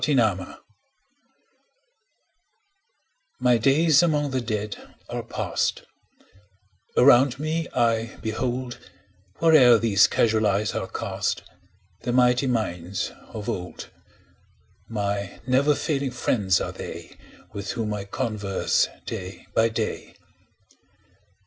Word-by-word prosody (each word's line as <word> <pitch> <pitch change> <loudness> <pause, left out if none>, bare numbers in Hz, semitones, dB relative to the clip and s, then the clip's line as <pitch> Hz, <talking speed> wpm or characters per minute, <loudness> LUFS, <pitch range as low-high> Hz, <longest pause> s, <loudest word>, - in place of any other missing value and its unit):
His 150 - +2
Books 105 -7 0 2.8
MY 125 -2 +3
days 145 +5 +4
among 150 -4 +1
the 130 -1 -1
Dead 105 -2 -3 0.3
are - - -3
past; - - -2 1.1
Around 130 0 +6
me 160 +2 -2
I 115 -2 +1
behold, 120 +2 -3 0.6
Where'er 145 -8 +6
these 105 -3 +4
casual 110 -1 +2
eyes 100 +1 0
are - - -3
cast, - - -3 0.6
The 120 - -2
mighty 125 +1 +3
minds 95 -6 -2 0.2
of 105 -2 -8
old: 90 0 -5 1.0
My 100 -3 -3
never 135 +4 +3
failing 140 -3 -1
friends 105 -6 +1
are - - -3
they, - - -8
5 - - -19 0.4
With 100 -1 -4
whom 110 -2 -2
I 100 -1 -4
converse 100 -2 0 0.2
day 90 +1 -7
by 115 0 +3
day. 110 -1 -4
115 Hz, 105 wpm, -24 LUFS, 105-130 Hz, 2.8 s, Around